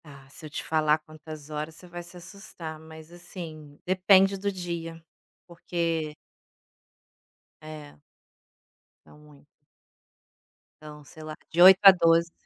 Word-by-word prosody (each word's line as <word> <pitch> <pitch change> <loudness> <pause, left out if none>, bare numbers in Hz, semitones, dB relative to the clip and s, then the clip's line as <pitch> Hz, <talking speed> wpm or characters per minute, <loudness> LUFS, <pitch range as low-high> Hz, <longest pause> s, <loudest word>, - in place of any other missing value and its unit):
Ah, 140 -3 -15
se 155 +2 -11
eu - - -12
te - - -6
falar 155 -1 +2
quantas 155 -1 -12
horas, 155 +1 -5
você 180 - -14
vai 175 0 -8
se 175 +1 -13
assustar, 175 -4 -10
mas, 160 0 -14
assim, 165 -4 -11
depende 190 +1 +4
do 200 +1 -3
dia, 170 -3 -6 0.5
porque 170 -3 -3 1.5
É. 150 - -11 1.0
São - - -18
muitas. 150 -1 -19 1.4
Então, 150 -1 -11
sei 160 +3 -15
lá, 155 0 -8
de 170 - 0
8 190 +1 +10
a 195 - +12
12, 170 -2 +2
165 Hz, 130 wpm, -26 LUFS, 155-175 Hz, 1.5 s, a